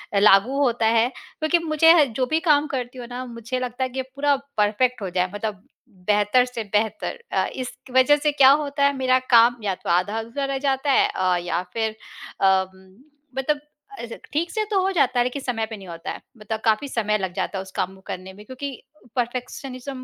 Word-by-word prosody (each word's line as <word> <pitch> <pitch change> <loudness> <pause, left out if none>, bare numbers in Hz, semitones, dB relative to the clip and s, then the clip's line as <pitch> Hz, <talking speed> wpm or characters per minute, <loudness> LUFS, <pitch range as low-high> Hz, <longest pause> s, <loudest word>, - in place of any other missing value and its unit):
लागू 205 +6 +5
होता 235 -3 +1
है। 230 +1 +3
क्योंकि 315 +5 -2
मुझे 315 +1 +5
ह 295 - +6
जो 255 0 -2
भी 315 +6 +1
काम 295 0 +4
करती 255 -2 -4
हूँ 240 - -7
ना 250 +1 -5
मुझे 235 +1 -5
लगता 250 0 -3
है 260 - -1
कि 260 +1 -3
पूरा 280 +2 0 0.2
परफेक्ट 220 +4 +1
हो 195 - -3
जाए 180 0 0
मतलब 205 -2 -4 0.4
बेहतर 210 +4 +4
से 240 -3 -5
बेहतर। 220 - -1
अ, - - +1
इस 255 -1 -6 0.2
वजह 260 +3 +6
से 295 +1 +1
क्या 275 -2 +7
होता 280 0 0
है 280 - +3
मेरा 255 0 +3 0.2
काम 235 +1 +6
या 195 -2 0
तो - - -4
आधा-अधूरा 225 +9 0
रह 275 0 -2
जाता 270 +1 0
है - - +4
अ, 185 -1 +2
या 175 0 -2
फिर 220 -1 -1 0.5
अ 190 -1 +5
उम, 190 0 -19 0.4
मतलब 290 +2 0 0.4
ऐसे 235 -1 -7 0.2
ठीक 330 +4 0
से 435 - 0
तो 395 - +3
हो 380 +1 +1
जाता 275 -8 +2
है - - +5
लेकिन 250 +3 -3
समय 235 -4 -2
पे 220 0 -8
नहीं 195 -2 -12
होता 165 0 -6
है - - -8 0.2
मतलब 220 +1 -4
काफ़ी 220 +5 +2
समय 215 -5 0
लग 190 -3 -4
जाता 195 - -3
है - - -2
उस 190 - -13
काम 185 +1 -1
को 190 - -18
करने 185 +1 -6
में 205 +2 -14
क्योंकि 260 +4 -6 0.4
परफेक्शनिज़्म 255 +2 -4
245 Hz, 215 wpm, -23 LUFS, 210-270 Hz, 0.5 s, क्या